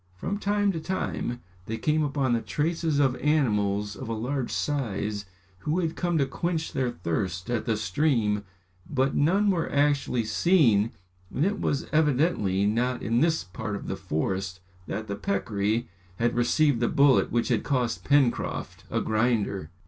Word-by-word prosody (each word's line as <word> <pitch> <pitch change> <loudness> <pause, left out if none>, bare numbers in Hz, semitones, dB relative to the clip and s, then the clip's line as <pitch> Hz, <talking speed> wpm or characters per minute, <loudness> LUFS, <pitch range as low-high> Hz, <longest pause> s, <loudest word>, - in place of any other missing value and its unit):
From 200 - -3
time 205 0 +1
to 165 - -3
time 155 -8 -3 0.3
they 115 - -3
came 155 +4 +1
upon 140 -4 0
the 115 - +1
traces 160 +1 -1
of 135 -3 +3
animals 105 -9 +1
of 130 - -7
a - - -1
large 125 +3 -2
size 105 -7 -2 0.3
who 150 - -1
had 165 -3 -1
come 175 -1 0
to 140 - +3
quench 165 +3 -2
their 130 -2 0
thirst 90 +1 -3
at 120 - -1
the 115 -3 0
stream 110 -1 +1 0.5
but 135 -2 +1
none 195 +8 +3
were 170 -3 -1
actually 140 -4 +2
seen 115 - +3 0.4
and 145 - +1
it 205 +2 -1
was 140 - 0
evidently 145 - +2
not 120 +4 0
in 115 +2 +1
this 160 +2 +2
part 100 +3 -5
of - - -6
the - - -2
forest 95 +1 -2 0.3
that 110 +2 -3
the 100 -2 -4
peccary 105 +3 -1 0.3
had 120 +5 +1
received 120 +2 +3
the 120 - +2
bullet 140 -2 +4
which 120 +2 +1
had 115 -4 +1
cost 125 -4 -1
Pencroft 140 -4 +1
a - - 0
grinder. 110 -6 0
125 Hz, 165 wpm, -27 LUFS, 105-150 Hz, 0.5 s, bullet